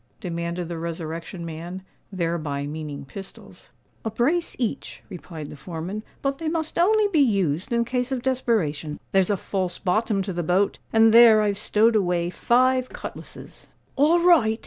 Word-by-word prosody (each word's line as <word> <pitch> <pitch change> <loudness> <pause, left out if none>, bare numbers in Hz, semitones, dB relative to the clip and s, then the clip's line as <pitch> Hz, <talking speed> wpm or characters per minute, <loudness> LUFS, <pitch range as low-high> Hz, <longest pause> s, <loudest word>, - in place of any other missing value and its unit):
demanded 170 0 -4
the 170 -1 -5
Resurrection 165 +1 -5
Man, 170 +3 -7 0.3
thereby 165 -6 -2
meaning 145 -1 -6
pistols. 195 +8 -12 0.3
"A 225 - -1
brace 280 +11 0
each," 235 -4 -4
replied 165 -5 -8
the - - -8
foreman. 170 +7 -6 0.2
"But 275 0 -1
they 325 - -3
must 320 0 -2
only 425 +4 +4
be 330 -6 +2
used 195 - +1
in 235 0 +2
case 250 +2 -2
of 255 -2 -2
desperation. 210 - -1
There's 190 0 +3
a 205 - +1
false 185 -2 -2
bottom 205 +1 0
to 190 -1 -4
the 175 - -2
boat; 180 +4 +1
and 225 0 +5
there 225 -2 +8
I've 205 -1 0
stowed 225 +2 +3
away 175 -4 +1
five 255 +4 +2
cutlasses." - - -10 0.3
"All 305 +5 +4
right!" 240 -11 +4
195 Hz, 160 wpm, -24 LUFS, 170-240 Hz, 0.3 s, there